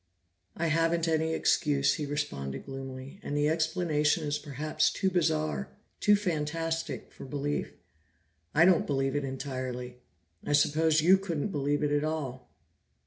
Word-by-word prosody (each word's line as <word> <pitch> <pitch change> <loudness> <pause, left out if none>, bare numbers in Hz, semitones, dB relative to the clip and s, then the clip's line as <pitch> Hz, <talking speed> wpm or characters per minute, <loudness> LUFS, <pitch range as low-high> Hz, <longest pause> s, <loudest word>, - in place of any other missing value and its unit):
"I 170 - 0
haven't 165 +1 +2
any 160 0 +1
excuse," 140 -5 +2
he 150 -2 -3
responded 70 - -3
gloomily, 135 +4 -8
"and 145 - -3
the 145 0 +2
explanation 160 -1 +1
is 150 0 -1
perhaps 150 +2 0
too 190 -1 0
bizarre, 75 - 0 0.3
too 210 - +5
fantastic 165 -3 -2
for - - -11
belief. 145 +2 -3 0.8
I 160 +2 +7
don't 180 -2 +4
believe 135 -1 0
it 145 - 0
entirely; 130 -2 -5 0.5
I - - -1
suppose 155 +2 +3
you 185 +4 +6
couldn't 175 -2 -2
believe 145 -3 0
it 145 - +1
at 145 0 +2
all." 145 - -4
150 Hz, 140 wpm, -29 LUFS, 135-160 Hz, 0.8 s, I